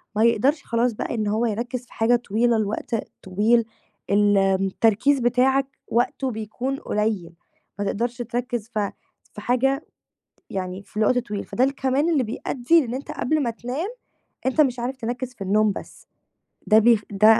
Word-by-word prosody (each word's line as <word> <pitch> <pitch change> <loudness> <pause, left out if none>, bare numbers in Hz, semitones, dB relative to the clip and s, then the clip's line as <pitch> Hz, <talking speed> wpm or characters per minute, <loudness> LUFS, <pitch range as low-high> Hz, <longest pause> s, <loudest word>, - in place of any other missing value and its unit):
ما 220 - +3
يقدرش 265 +6 +3
خلاص 235 0 +1
بقى 235 - -3
إن 215 -2 -1
هو 220 +3 +1
يركِّز 240 +3 -3
في - - -19
حاجة 230 +2 +3
طويلة 235 0 +1
لوقت 215 +2 -2 0.3
طويل 220 +5 +2 0.4
ال 205 0 +4
التركيز 195 +7 +2
بتاعك 260 +3 +3 0.2
وقتُه 250 +2 0
بيكون 220 +5 -3
قليّل، 210 -8 -2 0.5
ما 205 - -1
تقدرش 235 +5 -1
تركِّز 240 -1 -3
في 205 -2 0 0.4
في 210 - -8
حاجة 270 +4 +1 0.6
يعني 185 0 -4
في 210 - -14
الوقت 220 +4 +3
طويل، 210 -4 -4
فده 250 - 0
الكمان 275 +3 +1
اللي 290 -6 +2
بيأدّي 250 +7 +1
إن 235 - -5
أنت 275 - -6
قبل 305 +1 0
ما 235 - 0
تنام 250 - -4 0.6
أنت 265 +4 +2
مش 255 -4 +3
عارف 255 +2 -3
تركِّز 245 +1 -4
في 195 - -9
النوم 210 +2 +3
بس، - - -10 0.6
ده 215 0 +7
بي 230 -1 +5
ده 215 +2 +6
235 Hz, 160 wpm, -23 LUFS, 210-255 Hz, 0.6 s, ده